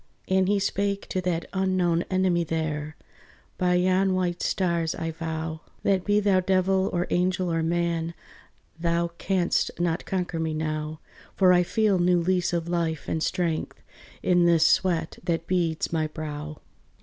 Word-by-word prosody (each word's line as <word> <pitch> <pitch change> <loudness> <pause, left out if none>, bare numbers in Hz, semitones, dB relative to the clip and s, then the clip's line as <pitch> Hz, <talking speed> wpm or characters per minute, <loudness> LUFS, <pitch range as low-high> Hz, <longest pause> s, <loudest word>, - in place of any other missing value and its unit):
And 190 0 +2
he 205 +1 +3
spake 200 0 -1
to 185 - -1
that 175 -2 -1
unknown 185 -3 +1
enemy 185 -2 +2
there, 155 -2 -3 0.6
"By 180 -1 +2
yon 185 +1 +2
white 175 -1 -1
stars 170 -3 0
I 165 0 -3
vow, 160 0 -4 0.2
That 190 -2 +2
be 205 0 +3
thou 200 -2 +3
devil 190 +1 +2
or 175 0 0
angel 180 -1 +1
or 165 - +1
man, 170 0 -1 0.6
Thou 170 0 0
canst 185 -3 +1
not 170 0 0
conquer 180 -3 -2
me 160 -1 -1
now; 155 0 -3 0.4
For 185 -2 +5
I 180 - +5
feel 200 +1 +1
new 175 0 +3
lease 180 +1 +1
of 170 -1 -2
life 165 -3 -1
and 160 - -1
strength 170 -2 -1 0.4
In 175 -1 +4
this 165 -2 +4
sweat 175 -4 +1
that 165 -2 -1
beads 170 -3 -1
my 160 -1 +1
brow." 150 -1 -6
175 Hz, 155 wpm, -26 LUFS, 165-185 Hz, 0.6 s, For